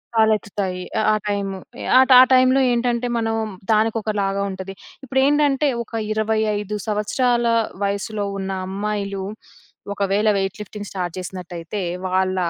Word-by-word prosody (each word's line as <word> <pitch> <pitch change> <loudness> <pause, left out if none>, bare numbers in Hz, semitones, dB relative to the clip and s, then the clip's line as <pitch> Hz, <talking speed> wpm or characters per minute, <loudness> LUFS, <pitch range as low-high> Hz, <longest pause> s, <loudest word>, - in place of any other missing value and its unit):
తలెత్తుతాయి. 205 -4 +1 0.2
ఆహ్, 215 - +1
ఆ - - +3
టైము 200 -1 -2 0.3
ఎహ్, 260 +1 +6
ఆ - - +11
టైములో 255 +1 +5
ఏంటంటే 240 0 0
మనము 225 -1 0 0.3
దానికొకలాగా 210 -2 0
ఉంటది. 190 0 -6 0.3
ఇప్పుడేంటంటే 275 +2 +2 0.2
ఒక 230 - -25 0.2
25 215 -1 0
సంవత్సరాల 235 +3 +1 0.4
వయసులో 200 +1 -2
ఉన్న 195 0 -3 0.2
అమ్మాయిలు 200 0 -3 0.7
ఒకవేళ 205 +1 +1
వెయిట్ 195 -1 -2
లిఫ్టింగ్ 210 0 -7
స్టార్ట్ 180 -3 -4
జేసినట్టయితే 180 0 -6 0.3
వాళ్ళ 185 0 +1
210 Hz, 115 wpm, -21 LUFS, 195-225 Hz, 0.7 s, ఆ